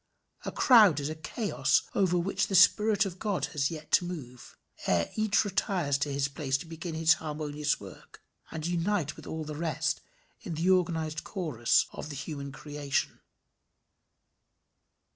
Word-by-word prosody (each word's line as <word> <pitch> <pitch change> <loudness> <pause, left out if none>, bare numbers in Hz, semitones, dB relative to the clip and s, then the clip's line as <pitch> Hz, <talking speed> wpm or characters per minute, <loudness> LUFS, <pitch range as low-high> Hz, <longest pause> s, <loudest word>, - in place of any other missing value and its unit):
A - - -3
crowd 215 - +6
is 145 +1 -3
a 155 - -4
chaos 200 +7 0
over 185 -3 +2
which 175 +3 0
the 195 - -1
Spirit 210 +2 +5
of 185 -1 -6
God 205 -4 -1
has 140 -3 +1
yet 155 -2 -8
to - - +5
move, 125 -9 -8 0.3
ere 85 -2 +1
each 215 -1 +2
retires 175 -7 0
to 145 - -1
his 140 0 0
place 140 -1 -1
to 140 - -9
begin 165 0 -6
his 160 0 +5
harmonious 150 -1 -2
work, 95 -2 -13 0.3
and 160 -1 -5
unite 175 -2 0
with - - -12
all 160 0 -4
the 155 0 -6
rest 160 0 -1 0.4
in 170 - -6
the 170 +4 +2
organized 160 -4 0
chorus 150 - +1
of - - -7
the 145 - -6
human 140 -1 -6
creation. 145 0 -3
160 Hz, 160 wpm, -29 LUFS, 145-180 Hz, 0.4 s, crowd